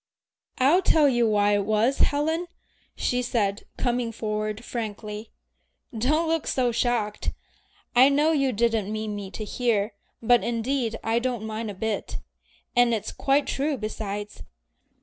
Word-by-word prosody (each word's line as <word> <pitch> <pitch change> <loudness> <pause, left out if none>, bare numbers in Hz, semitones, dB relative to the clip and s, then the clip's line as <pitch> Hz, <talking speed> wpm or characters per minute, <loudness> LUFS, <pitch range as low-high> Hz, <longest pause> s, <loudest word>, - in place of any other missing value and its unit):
"I'll 285 +8 +4
tell 315 -5 +4
you 240 -4 +3
why 205 -1 +3
it 205 -1 +2
was, 220 +6 +1
Helen," 320 +4 +1 0.5
she 250 0 0
said, 210 -5 -1
coming 245 -2 0
forward 215 0 -3
frankly. 215 -1 -5 0.7
"Don't 305 +9 +1
look 325 -1 0
so 250 -2 +1
shocked. 230 -3 -1 0.6
I 255 +3 +8
know 295 +3 +3
you 275 -4 +2
didn't 225 -2 0
mean 215 -1 -3
me 200 -2 -6
to 215 - -6
hear, 215 -2 0 0.3
but 240 +1 +4
indeed 235 0 -1
I 225 +1 +1
don't 240 -3 -2
mind 220 0 -4
a 205 - -6
bit. 215 +1 -3 0.6
And 245 -1 +4
it's 215 -1 -4
quite 280 +1 +1
true 285 +1 -1
besides. 210 -2 -5
230 Hz, 145 wpm, -25 LUFS, 215-260 Hz, 0.7 s, I